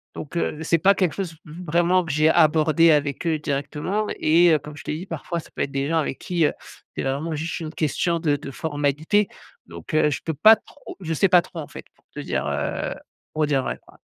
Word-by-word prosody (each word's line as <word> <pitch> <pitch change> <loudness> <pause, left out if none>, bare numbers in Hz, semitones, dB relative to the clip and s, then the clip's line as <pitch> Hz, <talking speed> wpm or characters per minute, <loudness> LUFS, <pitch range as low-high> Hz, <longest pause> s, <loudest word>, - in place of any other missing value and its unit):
Donc 150 - -8
heu, 155 -2 -1
c'est 165 +1 +2
pas 195 +5 +5
quelque 180 -5 +1
chose 185 -5 -4
v 150 - -11
vraiment 175 +3 +3
que 160 - -4
j'ai 155 +2 +3
abordé 160 +1 +4
avec 145 0 0
eux 160 -1 +1
directement 150 +9 -2
et 170 +2 +5
heu, 150 - +3
comme 150 +1 -10
je - - -10
t'ai 150 - -3
dit, 180 - -7
parfois 170 0 -4
ça - - -12
peut - - -3
être 140 - -1
des 135 0 -1
gens 165 - +1
avec 135 -3 -3
qui, 170 -3 0
heu, - - +1 0.4
c'est - - -1
vraiment 145 +4 -2
juste 165 +3 -4
une 160 0 -6
question 170 +3 0
de 150 -3 +1
de 140 -1 -7
formalités. 150 +7 0 0.4
Donc 85 - -10
heu, 155 -1 +4
je 145 - -3
peux 160 - -2
pas 215 +10 +7
trop 290 - -13
je 165 -3 -3
sais 190 +5 +2
pas 180 -1 +6
trop 170 - -10
en 150 - -6
fait, - - -10
pour - - -34
te - - -5
dire, - - -2
heu - - -2 0.4
pour 155 0 +1
dire 140 -2 +2
vrai, - - -3
quoi. - - -20
155 Hz, 240 wpm, -23 LUFS, 145-170 Hz, 0.4 s, pas